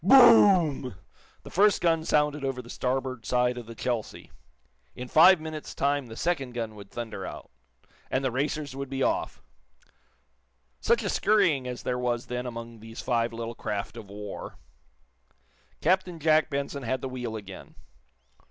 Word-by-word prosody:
Boom! 190 - +6 0.5
The - - -11
first 205 +2 +4
gun 165 -2 +2
sounded 150 -1 +1
over 135 -2 -2
the 120 - -10
starboard 130 -2 -2
side 125 0 +1
of 120 -2 -8
the 115 - -9
"Chelsea." 120 -2 -4 0.6
In 125 - -6
five 170 +6 +7
minutes' 155 -1 -7
time 140 -1 0
the 110 - -9
second 135 -5 -1
gun 115 -2 -3
would 100 -2 -12
thunder 115 -5 -6
out - - -8 0.6
and 130 +1 0
the 130 - +1
racers 140 +2 -2
would 140 -1 -5
be 135 0 -1
off! 335 +2 -1 1.4
Such 470 - +2
a - - -2
scurrying 175 -12 +2
as 125 -1 -6
there 125 0 -1
was 120 -1 -1
then 125 0 -4
among 115 -1 -7
these 115 +1 -10
five 115 -1 0
little 115 0 -5
craft 105 -1 -4
of 110 -4 -10
war! 105 0 -8 1.2
Captain 185 -2 +1
Jack 155 0 +3
Benson 140 -1 -3
had 130 +1 -2
the - - -3
wheel 125 -3 -5
again. 100 -3 -10
130 Hz, 160 wpm, -27 LUFS, 115-155 Hz, 1.4 s, five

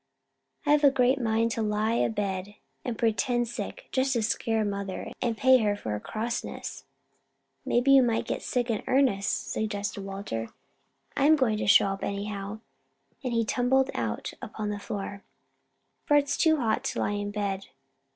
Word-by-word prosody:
I've 295 0 +4
a 285 - +9
great 265 0 +2
mind 225 0 +1
to 225 - -2
lie 215 +1 +1
a 235 - +2
bed 200 -2 -3 0.3
and 240 -3 -3
pretend 240 +2 +1
sick; 370 - -6
just 265 +1 +1
to 235 -3 +1
scare 225 -1 0
mother 200 -2 -4
and 235 -2 0
pay 260 +1 +6
her 210 -2 +2
off 205 - -8
for 110 - -3
her 105 - -2
crossness." 230 - -4 0.8
"Maybe 245 +3 +3
you 270 -1 +8
might 235 -3 +1
get - - -3
sick 245 -1 -1
in 215 - -1
earnest," 255 -7 +1
suggested 205 -2 -2
Walter. 195 - -4 0.7
"I'm 295 +3 +5
going 250 -7 +1
to - - -1
get 205 - +7
up 195 -1 -2
anyhow," 200 +1 -4 0.6
and 255 - -2
he 230 -1 +1
tumbled 260 +3 +2
out 110 -3 -3
upon 215 -1 -4
the 205 - -4
floor, 200 -1 -5 0.8
"for 295 - +5
it's 285 -1 +1
too 315 -1 +4
hot 225 -5 0
to - - -2
lie - - 0
in 205 0 -2
bed. 200 -2 -2
220 Hz, 170 wpm, -28 LUFS, 205-250 Hz, 0.8 s, a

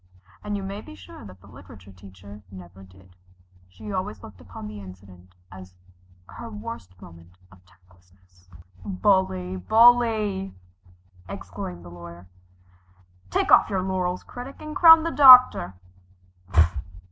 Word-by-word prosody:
And 205 0 -4
you 195 - -7
may 195 +2 -7
be 100 - -14
sure 90 -3 -14
that 95 -1 -16
the 100 - -19
literature 95 +1 -16
teacher 95 +2 -15
never 95 0 -14
did. 95 -1 -20 0.5
She 205 - -11
always 185 - -6
looked 95 -5 -14
upon 90 +4 -12
the 105 0 -10
incident 90 -1 -16 0.2
as 90 -1 -14 0.5
her 235 - -11
worst 210 - -10
moment 85 0 -17
of 95 -1 -21
tactlessness. 90 -1 -29 0.3
"Bully, 185 - -1
bully!" 220 - +2 0.7
exclaimed 85 -1 -9
the 85 - -12
Lawyer, 85 0 -13 1.0
"Take - - -1
off - - +5
your 190 -3 -2
laurels, 185 -1 -3
Critic, 250 +3 -11
and 305 0 -9
crown 325 -2 +7
the 335 - -3
Doctor!" 255 - +6
95 Hz, 130 wpm, -23 LUFS, -, 1.0 s, crown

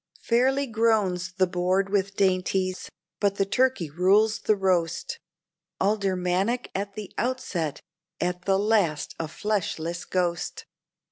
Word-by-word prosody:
Fairly 265 +4 +2
groans 215 -6 +1
the 190 0 +3
board 185 +2 0
with 200 -1 0
dainties, 185 -1 0 0.3
but 200 -1 +2
the 195 - +1
turkey 255 -4 +1
rules 195 +7 +3
the 215 - +2
roast, 180 -4 0 0.6
Aldermanic 195 +2 0
at 200 +1 -3
the 210 -3 -7
outset, 220 - -2 0.4
at 180 0 -2
the 195 -1 +3
last 200 -7 +1
a 165 - -2
fleshless 170 -2 -2
ghost. 175 -2 -2
195 Hz, 120 wpm, -26 LUFS, 180-215 Hz, 0.6 s, the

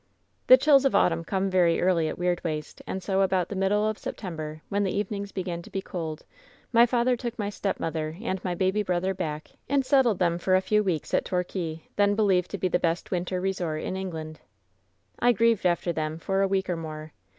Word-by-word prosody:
"The - - +10
chills 280 - +5
of 270 - +2
autumn 165 -1 +3
come 190 +2 -1
very 175 -3 +3
early 175 -3 +2
at - - -4
Weirdwaste, 170 -4 -2
and 190 - -4
so 195 0 +1
about 185 -2 +1
the 205 - -4
middle 205 +3 +2
of 215 0 -2
September, 155 -5 -6
when 200 +1 0
the 195 - 0
eve 205 -1 -1
nings 200 -1 -4
began 175 -2 -4
to - - -13
be 195 - -3
cold, 160 -3 -5 0.5
my 235 +1 +7
father 245 +1 +2
took 240 -1 -5
my 205 -2 -2
stepmother 160 -5 -3
and 190 -5 -3
my 180 -2 -2
baby 190 +4 +1
brother 185 -1 0
back 155 -4 -5 0.2
and 275 -1 +2
settled 255 -7 +3
them 170 -1 +1
for 185 +2 +2
a - - +5
few 210 +2 +2
weeks 175 -6 -2
at - - +2
Torquay, 175 -3 -3
then 205 0 +3
believed 195 -4 +2
to 200 - -4
be 185 - 0
the 180 - +1
best 165 0 -1
winter 180 0 -1
resort 180 -5 -2
in - - -3
England. 160 -5 -5 0.8
"I 245 0 +4
grieved 225 -3 +3
after 175 0 0
them 155 0 -3
for 195 +4 -1
a 195 - +3
week 190 0 0
or 180 - -1
more. 155 -1 -7
185 Hz, 215 wpm, -26 LUFS, 170-205 Hz, 0.8 s, The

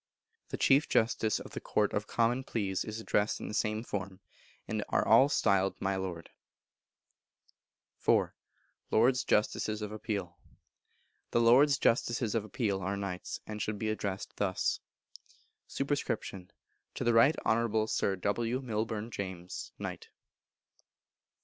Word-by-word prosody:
The - - -4
Chief 140 +2 +4
Justice 110 -1 +2
of - - -10
the - - -5
Court 105 -1 0
of 105 +1 -1
Common 120 +3 +1
Pleas 100 -7 -2
is 110 +1 -6
addressed 105 -1 0
in - - -6
the - - -6
same 110 0 0
form, 95 -4 -5 0.5
and - - -2
are - - +1
all 135 - +7
styled 95 -8 +2
My 95 0 0
Lord. 90 -3 -5 1.8
iv. - - +4 0.6
Lords 125 +3 +3
Justices 105 0 +1
of 105 - -4
Appeal. 100 -5 -4 0.9
The - - +2
Lords 130 +5 +6
Justices 120 -2 +1
of 115 -3 0
Appeal 105 -3 -1
are 95 +2 -2
Knights, 95 -2 -5
and 105 0 -6
should 105 -1 -2
be 110 +2 -2
addressed 100 -3 -4
thus: 95 -2 0 0.9
Sup. 135 - -3
To 100 -9 -5
the 120 - +3
Right 115 +7 +6
Honourable 110 -1 +2
Sir 100 -2 0
W. 115 +6 -1
Milbourne 110 -2 -3
James, 95 -3 -6
Knt. - - -6
110 Hz, 135 wpm, -31 LUFS, 100-115 Hz, 1.8 s, all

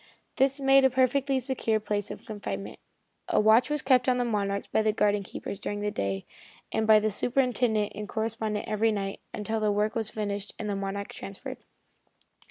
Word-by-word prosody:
This 270 +1 +3
made 270 0 +5
a 265 - +6
perfectly 265 +1 +2
secure 245 -4 0
place 205 -1 -2
of - - -8
confinement. 105 - -6 0.5
A - - +3
watch 220 +5 +5
was 295 -1 -1
kept 255 -1 +4
on 250 - +3
the 245 - +1
Monarch 200 -3 -1
by - - +3
the 215 0 +2
garden 210 -1 +2
keepers 195 +1 -7
during 205 0 -4
the 210 0 -1
day, 100 - -2 0.5
and 220 - 0
by 220 -1 +8
the 215 0 0
superintendent 240 -2 +1
and 210 +1 -6
the - - -12
correspondent 220 -1 -2
every 220 +1 +2
night, 195 -2 -3
until 220 +2 -2
the 215 -1 +2
work 210 +1 +1
was 225 -2 +1
finished 205 -2 -4
and 215 - -4
the 205 - -1
Monarch 195 +1 -4
transferred. 195 0 -7
215 Hz, 190 wpm, -28 LUFS, 205-245 Hz, 0.5 s, by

